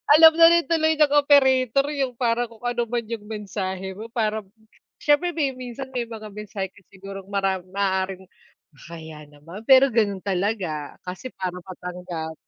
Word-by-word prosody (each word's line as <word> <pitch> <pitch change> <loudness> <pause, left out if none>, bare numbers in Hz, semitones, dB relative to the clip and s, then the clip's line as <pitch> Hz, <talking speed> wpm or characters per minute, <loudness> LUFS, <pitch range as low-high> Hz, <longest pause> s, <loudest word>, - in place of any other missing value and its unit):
Alam 320 +2 +9
na 330 0 +8
rin 340 0 +3
tuloy 315 -2 +2
ng 295 -2 +4
operator 275 -2 +4
yung 265 -4 -2
para 240 -1 0
kung 230 - -16
ano 240 0 0
man 235 -2 -2
yung 230 -2 -5
mensahe 190 -3 -4
mo, 220 +4 -9
para 220 -2 -1 0.6
syempre 295 +4 +2
may 290 -6 -1
minsan 255 +1 -7
may 245 - 0
mga 220 -1 -8
mensahe 210 -2 -5
kung 190 - -21
sigurong 195 0 -10
mara 195 -2 0
maaaring, 190 0 -2 0.5
kahiya 160 0 -10
naman, 165 +8 -11
pero 265 +3 +7
gano'n 205 -4 +2
talaga 185 -6 -2
kasi 185 +8 -6
para 185 -4 -4
matanggap. 180 -3 -7
215 Hz, 160 wpm, -24 LUFS, 190-260 Hz, 0.6 s, Alam